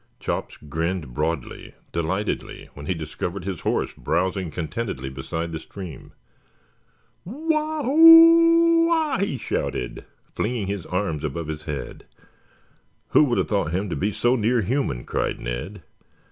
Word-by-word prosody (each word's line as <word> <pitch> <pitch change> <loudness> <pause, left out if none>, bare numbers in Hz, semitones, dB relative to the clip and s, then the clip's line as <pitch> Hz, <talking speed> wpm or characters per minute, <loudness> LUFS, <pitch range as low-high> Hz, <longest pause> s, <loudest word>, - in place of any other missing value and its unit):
Chops - - -4
grinned 80 -1 -3
broadly, 75 0 -3 0.2
delightedly, 95 +6 -3
when 70 0 -10
he 90 - 0
discovered 85 +4 -5
his 95 -4 -4
horse - - -1
browsing 95 +6 -1
contentedly 80 - -4
beside 80 +5 -4
the 80 - -4
stream. 90 -4 -10 1.1
"Wah 305 - -1
hoo 330 +3 +7
wah!" 320 -7 +1
he 195 -8 -1
shouted, 60 - -3 0.3
flinging 115 -2 -2
his 100 -2 -4
arms 90 -5 -2
above 80 +2 -3
his 75 -1 -6
head. 75 -3 -6 1.0
"Who - - +5
would 120 -4 0
have - - 0
thought 100 -6 0
him 95 +1 -2
to - - -1
be 105 +3 -1
so 120 +5 +2
near 115 +1 +2
human?" 110 - -1
cried - - -2
Ned. 70 +11 -5
95 Hz, 135 wpm, -23 LUFS, -, 1.1 s, hoo